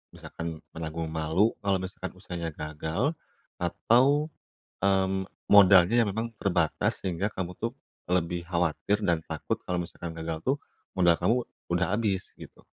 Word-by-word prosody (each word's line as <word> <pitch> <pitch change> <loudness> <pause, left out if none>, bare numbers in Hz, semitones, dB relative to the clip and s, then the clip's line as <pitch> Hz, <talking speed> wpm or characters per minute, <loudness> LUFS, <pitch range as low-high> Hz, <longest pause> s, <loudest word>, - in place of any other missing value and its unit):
misalkan 85 -1 -7
menanggung 80 0 -4
malu 80 +7 +2
kalau 100 -1 +1
misalkan 95 0 -6
usahanya 90 -3 -5
gagal 80 - -2 0.5
atau, 135 - +3 0.5
mmm, 95 -1 +2 0.3
modalnya 100 +3 +7
yang - - -2
memang 115 +2 -3
terbatas 90 -5 +1
sehingga 95 +2 -1
kamu 90 -2 -4
tuh - - -2 0.4
lebih 85 -1 0
khawatir 90 +4 0
dan 85 -4 +3
takut - - -3
kalau 90 - -1
misalkan 85 0 -7
gagal 80 0 -3
tuh 135 +2 +3 0.4
modal 85 -2 +4
kamu 115 - +3 0.4
udah 90 +1 +2
habis 105 -4 -1
gitu. - - -13
90 Hz, 135 wpm, -28 LUFS, 85-100 Hz, 0.5 s, modalnya